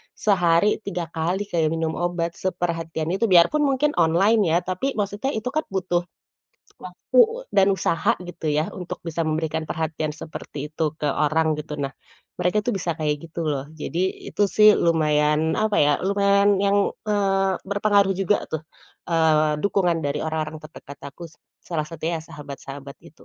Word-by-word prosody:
sehari 185 0 +2
3 180 -4 -4
kali, 175 +5 -1
kayak 165 -2 +2
minum 160 -1 -1
obat. 175 -1 -1
Seperhatian 165 -3 -2
itu. 195 +5 -1
Biarpun 185 - +5
mungkin 280 +2 +2
online, 195 +7 +4
ya. - - +5
Tapi, 185 +10 -2
maksudnya, 205 +6 -2
itu 220 +3 -3
kan 310 +2 0
butuh 180 -2 -1 0.8
waktu, - - +1 0.3
dan 195 0 +5
usaha, 190 +3 +1
gitu 175 -2 -8
ya, 155 +2 0
untuk 180 -2 -6
bisa 165 0 -2
memberikan 155 0 -1
perhatian 155 -1 -3
seperti 150 -1 -7
itu 155 -1 -1
ke 150 - 0
orang, 155 +2 +1
gitu. 150 0 -6
Nah, 135 -1 -3 0.5
mereka 180 +4 +1
itu 245 - 0
bisa 175 -3 -1
kayak 150 -1 0
gitu, 170 - -5
loh. 140 -2 -1
Jadi, 170 +4 -3
itu 205 - -1
sih, 215 0 +7
lumayan, 155 -1 +2
apa 215 -1 +1
ya. 145 0 +4
Lumayan 200 0 +3
yang, 200 0 +2 0.2
eee, 195 -2 +1 0.2
berpengaruh 200 -1 +3
juga 195 +1 +1
tuh, 160 -1 -3 0.5
eee, 155 -2 +2
dukungan 180 -4 +1
dari 145 +1 -1
orang-orang 160 0 -3
terdekat 145 -2 -12
aku, 140 +5 -9
s - - -23 0.3
salah 160 -3 -3
satunya 165 +1 -3
ya - - -12
sahabat-sahabat 140 -1 -9
itu. 155 - -17
170 Hz, 160 wpm, -23 LUFS, 155-200 Hz, 0.8 s, sih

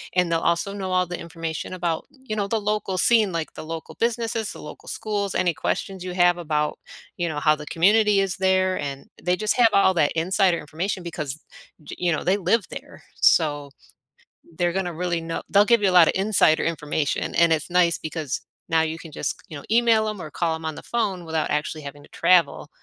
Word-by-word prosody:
and 180 -2 +2
they'll 165 - +2
also 170 +4 0
know 190 -2 -4
all 185 0 +2
the 175 0 -6
information 165 0 -5
about, 170 -3 -2
you 260 -6 -7
know, 205 -2 -1
the 220 +2 0
local 210 -2 -1
scene, 215 -1 +4
like, 165 -2 -4
the - - -8
local 165 0 -7
businesses, 230 -1 -1
the - - -11
local - - -11
schools, 205 -3 -3
any 175 -2 +2
questions 190 +4 -3
you 180 -1 -5
have 175 -1 +4
about, 150 -2 -1 0.4
you 175 -1 -1
know, 150 - -3
how 155 +1 +3
the 150 0 -9
community 205 +3 +4
is 190 -2 -2
there, 185 0 +2
and 140 -1 -5 0.2
they 180 +1 +1
just 215 +2 0
have 240 -2 +7
all 190 -1 +5
that 155 -4 +2
insider 180 +2 +2
information 175 +5 -4
because, 155 -4 -5 0.4
j - - -8
you 175 -1 +1
know, 155 - -1
they 190 +3 +2
live 200 +3 +1
there, - - -10 0.2
so 145 -3 +3 0.9
they're 175 -1 +1
gonna 180 -1 -2
really 170 0 -2
know 165 0 -4
they'll 200 +1 +5
give 230 -1 +3
you 195 - +4
a - - -2
lotta 180 +1 +5
insider 195 -6 +3
information, 150 -2 -2
and 170 -1 +5
it's 160 +2 -1
nice 175 -1 +3
because 155 -3 -4 0.3
now 160 -1 +3
you 160 +1 -3
can 160 -2 -11
just - - -2
c - - -25
you 155 - -7
know, 140 - -9
email 225 -2 +4
'em 210 -3 -5
or 155 - -6
call 165 -1 -1
'em 160 - -10
on 160 -1 -3
the - - -10
phone 195 -7 -2
without 160 -1 -2
actually 150 +1 -2
having 145 +1 -9
to - - -17
travel 170 -5 +2
175 Hz, 220 wpm, -23 LUFS, 160-195 Hz, 0.9 s, have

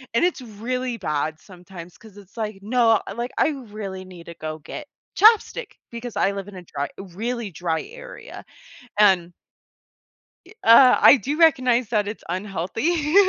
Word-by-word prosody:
and 235 - +4
it's 355 -6 -1
really 245 +2 -4
bad 155 -4 -2
sometimes, 180 -2 -13
'cause 215 -2 -17
it's, 200 -1 -16
like, 215 -3 -4
"No, 225 0 +3 0.2
like, 240 +1 -3
I - - +3
really 210 -9 -7
need 180 -2 -13
to 170 - -9
go 155 -1 -6
get 165 - -9 0.3
ChapStick," 445 +2 +4 0.2
because 235 0 -7
I 195 - +2
live 200 -1 -6
in 205 - -11
a 180 - -9
dry 145 -4 -5
really 210 +4 -5
dry 165 -1 -2
area, - - -11 0.6
and 185 -4 +4 1.2
i - - -15
uh, 250 +3 +7
I 285 - +8
do 285 +4 -3
recognize 255 -8 +3
that 210 -3 0
it's 210 - -7
unhealthy. 210 - -2
215 Hz, 160 wpm, -23 LUFS, 185-250 Hz, 1.2 s, I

